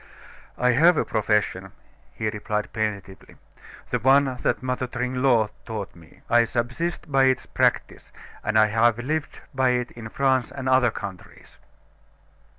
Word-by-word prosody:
"I 125 0 +3
have 160 +7 +5
a - - +1
profession," 105 -1 -1 0.4
he 110 - -4
replied 105 0 -4
plaintively. 100 -3 -5 0.6
"The - - 0
one 135 +3 +5 0.2
that - - -1
Mother 130 0 -2
Tringlot 125 -2 +1
taught 110 -5 -6
me. 80 -2 -18
I 120 0 +4
subsist 125 +8 -3
by 135 -1 +4
its 130 -1 +1
practise; - - -1 0.3
and 110 +1 0
I 110 - +6
have 115 +1 +2
lived 145 +5 -3
by 130 -1 +2
it 125 0 -4
in 115 -1 -9
France 130 0 +1
and 135 -1 -6
other 130 -2 +4
countries." 100 -4 -10
120 Hz, 145 wpm, -24 LUFS, 110-130 Hz, 0.6 s, I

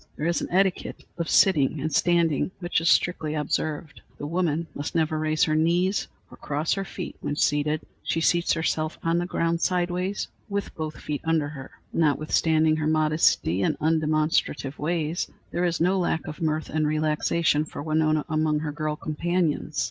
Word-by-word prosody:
There 150 - -3
is 170 0 +1
an - - -3
etiquette 190 0 0 0.2
of 170 - -2
sitting 155 -6 +4
and 155 +2 -2
standing, 170 -2 +2
which 175 -2 0
is 165 - +2
strictly 155 -3 +2
observed. 150 0 -2 0.2
The - - -6
woman 165 0 0
must 145 +3 -5
never 155 -1 +1
raise 155 0 +1
her 155 - +2
knees 175 +5 +2 0.2
or - - -12
cross 150 +3 -1
her 195 - -2
feet 190 -2 -7
when 145 - -2
seated. 150 +1 +1 0.2
She 165 - -1
seats 170 +1 +2
herself 160 -1 -1
on 165 +1 +2
the 175 - -2
ground 165 -1 0
sidewise, 180 +2 0 0.2
with 200 0 -3
both 155 -1 -5
feet 150 -2 -4
under 160 -3 +1
her. 135 -3 -9 0.2
Notwithstanding 155 +1 +2
her 155 -1 -1
modesty 155 - +2
and - - +1
undemonstrative 155 -2 0
ways, 165 +1 -1 0.2
there 175 - 0
is 170 -1 0
no 185 +3 +2
lack 170 -2 -1
of 150 +1 -8
mirth 155 -1 -1
and 155 0 +1
relaxation 155 0 +1
for 150 - -7
Winona 155 -1 +1
among 155 -1 +1
her 155 -2 -3
girl 155 0 -2
companions. 155 0 -1
155 Hz, 170 wpm, -25 LUFS, 150-170 Hz, 0.2 s, sitting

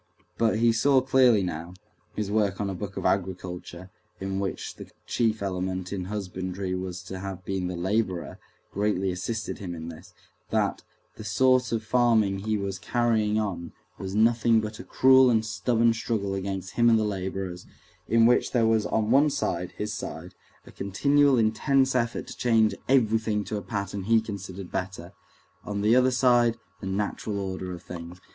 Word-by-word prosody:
But 110 -2 +2
he 115 0 +4
saw 135 +4 +4
clearly 125 -5 +4
now 85 0 -5 0.4
(his 105 -1 -2
work 105 -3 +1
on 100 -1 -1
a - - -4
book 100 +1 -6
of - - -4
agriculture, 90 -1 -3 0.3
in 95 0 -3
which 100 -1 -4
the - - -10 0.2
chief 110 -3 0
element 95 0 -3
in 95 -2 -3
husbandry 95 -1 -4
was 90 -1 -4
to 95 +1 -7
have 95 -1 -7
been 95 -2 -2
the 90 - -4
laborer, 95 0 -1 0.3
greatly 100 -2 0
assisted 110 +5 -4
him 90 -4 -5
in 80 0 -7
this) 80 -1 -12 0.4
that - - 0 0.4
the - - -8
sort 130 +4 +3
of 115 -2 -1
farming 110 -4 +2
he 110 +2 -1
was 100 -1 -4
carrying 110 -1 +1
on 90 -6 -4 0.3
was 95 0 -5
nothing 115 +1 +4
but 110 0 -5
a - - -7
cruel 130 0 +5
and 110 -2 +2
stubborn 115 +2 +2
struggle 110 -3 -2
between 95 0 -3
him 120 +5 +2
and 115 - +5
the 110 - +1
laborers, 95 -3 -4 0.4
in 115 +1 +4
which 125 +1 +3
there 120 -3 +3
was 110 -1 +2
on 110 0 0
one 140 +4 +5
side—his 90 -4 -3
side—a - - -9
continual 140 +7 +2
intense 130 +5 +2
effort 120 -2 -1
to - - -9
change 115 -3 +3 0.2
everything 110 -4 +2
to 105 - -5
a 105 - -2
pattern 100 0 -4
he 115 +1 +4
considered 100 -4 -7
better; 95 -1 -5 0.5
on 100 -1 -3
the 110 +3 +4
other 130 0 +5
side, 120 -2 +3 0.2
the 95 - -6
natural 100 +1 -2
order 95 -1 -4
of 90 -1 -8
things. 85 +1 -9
105 Hz, 170 wpm, -26 LUFS, 95-115 Hz, 0.5 s, cruel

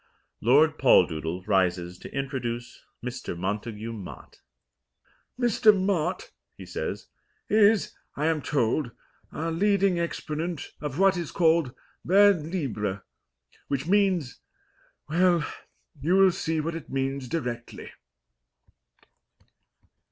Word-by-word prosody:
Lord 150 +7 +4
Poldoodle 85 - +3
rises 90 -3 0
to - - -10
introduce 120 -3 -4 0.2
Mr. 125 -7 -5
Montagu 105 +4 -4
Mott. 100 -5 -10 1.0
"Mr. 220 -4 +4
Mott," 185 - -1 0.3
he - - -9
says, - - -4 0.4
"is, 215 0 +4 0.2
I 150 - -1
am 160 -2 +1
told, 135 0 0 0.4
our 165 +1 -3
leading 195 +1 +2
exponent 165 -1 -4
of 145 -2 -4
what 195 0 +4
is 170 -3 -4
called 160 -6 +2 0.3
vers 195 -2 +5
libre, 110 - -3 0.6
which 140 0 -2
means 185 -7 +1 0.7
well, 170 0 +3 0.6
you 170 +6 +2
will 195 -1 +6
see 160 -2 -2
what 165 +2 -2
it 165 -2 -8
means 135 0 -2
directly." 120 -5 -5
150 Hz, 105 wpm, -26 LUFS, 120-180 Hz, 1.0 s, will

